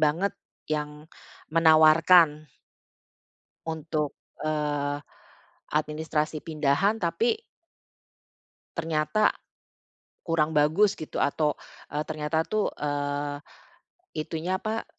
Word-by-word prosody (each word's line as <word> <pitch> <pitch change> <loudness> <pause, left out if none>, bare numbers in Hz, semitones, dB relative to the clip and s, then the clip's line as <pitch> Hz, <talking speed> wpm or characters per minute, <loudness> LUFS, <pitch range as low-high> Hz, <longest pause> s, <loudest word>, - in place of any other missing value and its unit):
banget 160 +6 +2 0.3
yang 150 0 -4 0.5
menawarkan 160 -1 +6 1.2
untuk, 155 -2 -2 0.3
eee, 145 -2 -1 0.7
administrasi 155 0 -1
pindahan 155 +6 +2
tapi 440 - +1 1.4
ternyata, 165 +5 +1 0.9
kurang 160 -2 +1
bagus 160 +7 +3
gitu 155 - -6
atau, 150 +1 +1 0.4
eee, 150 +1 0
ternyata 155 +1 -1
tuh, 215 +4 0
eee, 145 0 -2 0.8
itunya, 165 +4 -2
apa? 220 +1 -2
155 Hz, 75 wpm, -27 LUFS, 150-165 Hz, 1.4 s, menawarkan